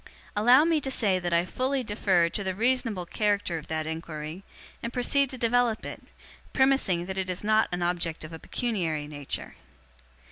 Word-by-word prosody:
Allow 245 +8 +6
me 325 -2 +2
to 270 - -3
say 205 -8 +2
that 175 -1 -3
I 170 +1 +3
fully 260 +6 -1
defer 195 -5 +2
to 200 +4 -4
the 190 -1 -2
reasonable 230 -4 0
character 205 -3 0
of 150 - -13
that 160 -1 -2
inquiry, 160 +2 -6 0.4
and 235 - -4
proceed 270 +2 +2
to 260 - -6
develop 235 -1 +1
it; - - -7 0.5
premising 265 -10 +3
that 190 +1 -4
it 185 -1 -2
is 180 +1 -3
not 215 +1 +3
an 180 0 -1
object 175 -2 -1
of 155 +1 -9
a 160 - -7
pecuniary 165 -12 -2
nature. 145 -2 -5
195 Hz, 180 wpm, -27 LUFS, 170-245 Hz, 0.5 s, Allow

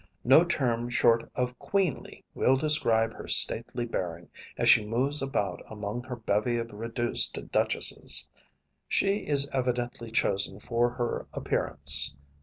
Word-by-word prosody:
No 135 +7 +6
term 120 -8 -1
short 115 -1 +2
of 125 0 -2
queenly 190 -8 -2
will 135 - +2
describe 115 -7 +1
her - - -10
stately 120 - +1
bearing 85 -6 -5 0.3
as - - 0
she 110 - +6
moves 130 +7 +1
about 105 -9 -2
among 105 +2 -5
her 130 -1 -5
bevy 115 +1 0
of 115 0 -4
reduced 115 +3 -1
duchesses. - - +2 0.6
She 200 +1 +1
is 140 -1 +1
evidently 120 -2 -2
chosen 100 -3 -1
for 120 +3 0
her 120 -1 -3
appearance. 70 0 +1
120 Hz, 130 wpm, -28 LUFS, 105-130 Hz, 0.6 s, No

